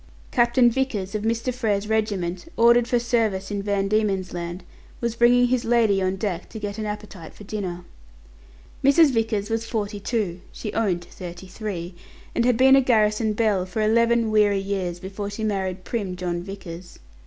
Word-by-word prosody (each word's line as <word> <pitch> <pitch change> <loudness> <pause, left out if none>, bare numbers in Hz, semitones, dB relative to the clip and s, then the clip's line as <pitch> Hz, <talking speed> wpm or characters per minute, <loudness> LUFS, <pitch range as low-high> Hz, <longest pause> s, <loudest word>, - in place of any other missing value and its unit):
Captain 240 0 +4
Vickers, 225 -7 -2
of 215 - -2
Mr. 230 +3 -1
Frere's 210 -4 -1
regiment, 205 - -1
ordered 235 +1 +5
for 245 - +2
service 225 -5 0
in 200 -1 -2
Van 200 -1 0
Diemen's 195 -3 0
Land, 175 +1 -5 0.4
was 235 -1 -2
bringing 245 +1 +5
his 250 -1 +1
lady 225 -4 +3
on 185 0 0
deck 190 -3 -3
to - - -8
get 205 0 -5
an 215 - -3
appetite 210 -5 -7
for - - -12
dinner. 185 -4 -5 1.0
Mrs. 280 +2 +6
Vickers 225 -3 -1
was 225 0 -1
forty 210 -3 -3
two 200 -5 -2
(she 210 - -6
owned 190 -6 0
to - - -19
thirty 180 0 -9
three), 185 -3 -5 0.4
and 235 - +1
had 250 -2 +3
been 265 +2 +7
a 270 - +6
garrison 215 -3 +2
belle 210 -4 +1
for 185 +4 -2
eleven 230 +1 +3
weary 210 -2 +4
years 195 -3 -3
before 200 +2 -5
she 205 +2 -5
married 190 -3 -2
prim 200 -5 -3
John 175 -1 -3
Vickers. 180 -2 -9
210 Hz, 175 wpm, -24 LUFS, 190-230 Hz, 1.0 s, been